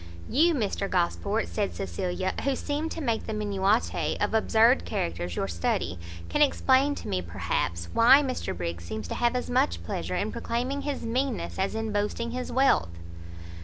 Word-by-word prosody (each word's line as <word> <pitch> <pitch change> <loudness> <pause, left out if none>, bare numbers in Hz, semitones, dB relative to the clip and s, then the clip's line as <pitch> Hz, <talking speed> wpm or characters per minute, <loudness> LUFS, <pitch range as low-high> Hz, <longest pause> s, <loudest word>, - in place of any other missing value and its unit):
"You, 320 +6 +3
Mr 200 -5 -1
Gosport," 200 +4 0
said 205 -2 -2
Cecilia, 185 -1 -2
"who 275 -1 +1
seem 295 +4 -2
to 330 - -5
make 230 -6 -1
the 220 - -3
minutiae 205 +1 0
of - - 0
absurd 225 +3 +4
characters 85 +1 -3
your 95 - -1
study, 85 0 -1 0.3
can 295 - 0
explain 280 0 +4
to - - -8
me, 90 - -1
perhaps, 85 -1 -2
why 260 +5 +7
Mr 255 - -3
Briggs 85 -1 -4
seems 105 +2 -5
to - - -2
have 240 +1 +1
as 250 - -1
much 85 - +1
pleasure 85 +1 -3
in - - -1
proclaiming 250 - -2
his 285 -1 -3
meanness, 245 -2 -2
as 195 +3 0
in 220 0 -2
boasting 210 +3 -1
his 250 +1 -4
wealth?" 260 - +3
220 Hz, 170 wpm, -27 LUFS, -, 0.3 s, why